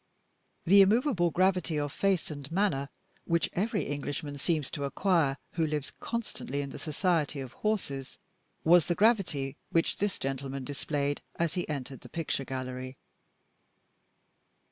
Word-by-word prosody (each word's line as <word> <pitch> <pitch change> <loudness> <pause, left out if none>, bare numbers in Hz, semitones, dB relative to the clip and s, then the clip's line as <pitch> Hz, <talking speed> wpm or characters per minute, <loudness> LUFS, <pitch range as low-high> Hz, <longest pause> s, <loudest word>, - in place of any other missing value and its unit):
The 200 +4 +8
immovable 205 - +4
gravity 180 -2 +2
of 145 -1 -2
face 195 -5 +1
and 145 0 -7
manner 165 -7 +1 0.4
which 170 0 +1
every 205 +3 0
Englishman 145 0 -3
seems 155 -2 0
to 140 - -3
acquire 145 -2 +2
who 165 -2 +1
lives 150 -2 -2
constantly 215 - -3
in 140 - -6
the - - -8
society 155 -2 0
of 130 -2 -6
horses, 140 -11 -2 0.5
was 170 0 +6
the 175 - +1
gravity 175 - +2
which 165 0 +2
this 205 -1 0
gentleman 135 0 -3
displayed 145 +1 -2
as 170 -2 0
he 180 -3 -2
entered 135 -3 -4
the - - -12
picture 160 -4 -2
gallery. 130 0 -5
155 Hz, 140 wpm, -30 LUFS, 140-185 Hz, 0.5 s, The